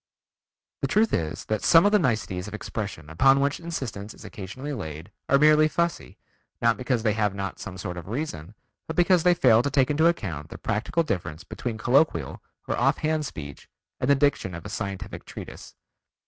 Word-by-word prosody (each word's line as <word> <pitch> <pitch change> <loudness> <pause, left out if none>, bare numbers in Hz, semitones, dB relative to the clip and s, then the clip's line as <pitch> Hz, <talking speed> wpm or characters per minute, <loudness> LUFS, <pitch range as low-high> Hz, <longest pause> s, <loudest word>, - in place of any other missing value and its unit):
The - - +1
truth 220 +1 +2
is 80 +1 -2
that 110 -1 -1
some 165 +2 +6
of 205 - +4
the 210 - +5
niceties 110 - -1
of 105 - -6
expression 100 -8 -5
upon 135 - +4
which 140 +1 0
insistence 120 -12 -5
is - - -13
occasionally 130 +9 -6
laid 80 - -7 0.2
are 140 - +6
merely 155 +1 +6
fussy, 165 - -2 0.4
not 115 -1 +3
because 125 -2 -1
they 110 -2 +2
have 105 -2 0
not 100 -1 -4
some 95 - -7
sort 90 -2 -5
of 85 - -8
reason, 105 - -5 0.3
but 160 - -4
because 175 0 +4
they 180 +1 +4
fail 115 -9 +5
to 145 - -1
take 135 0 +2
into 160 +3 +4
account 85 - -2
the - - -8
practical 115 +10 -1
difference 85 - -3
between 115 -3 -5
colloquial 120 - +1 0.3
or - - 0
off 135 +4 +3
hand 155 -1 0
speech 70 - -9 0.3
and 125 - 0
the 140 - +6
diction 135 - +1
of 85 - -9
a - - -5
scientific 100 0 -5
treatise. - - -10
115 Hz, 190 wpm, -26 LUFS, 95-150 Hz, 0.4 s, some